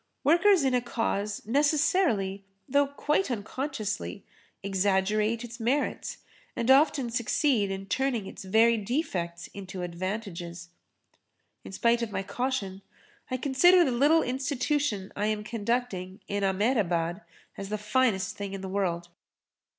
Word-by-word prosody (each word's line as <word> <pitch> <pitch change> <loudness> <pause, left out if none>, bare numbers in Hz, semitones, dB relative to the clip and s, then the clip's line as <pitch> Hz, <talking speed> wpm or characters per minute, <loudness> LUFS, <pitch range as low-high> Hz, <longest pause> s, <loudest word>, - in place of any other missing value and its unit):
Workers 350 +2 +5
in 265 -1 +2
a 250 - +3
cause 210 -4 -2
necessarily, 280 - +2 0.2
though 285 +1 +3
quite 295 +5 0
unconsciously, 215 - -4 0.4
exaggerate 200 +3 +1
its 235 0 -9
merits 255 +6 -1 0.4
and 235 +2 +2
often 270 -3 +4
succeed 235 -2 +1
in 195 0 -4
turning 240 0 -1
its - - -9
very 225 +4 +4
defects 195 - -2
into 190 -2 -7
advantages. 175 -1 -5 0.9
In - - -9
spite 235 +4 +2
of 230 -2 -3
my 195 - -2
caution 200 -2 -3 0.5
I 255 - -1
consider 345 +7 +5
the 265 - +1
little 290 +7 +4
institution 260 -5 -1
I 205 +1 0
am 215 -1 -1
conducting 210 -4 -2
in 200 0 -2
Ahmedabad 190 -4 +1 0.3
as 195 0 -7
the 215 - -1
finest 210 -2 +1
thing 200 -1 -5
in 195 - -5
the 190 - -5
world. 175 -3 -1
215 Hz, 130 wpm, -28 LUFS, 195-265 Hz, 0.9 s, Workers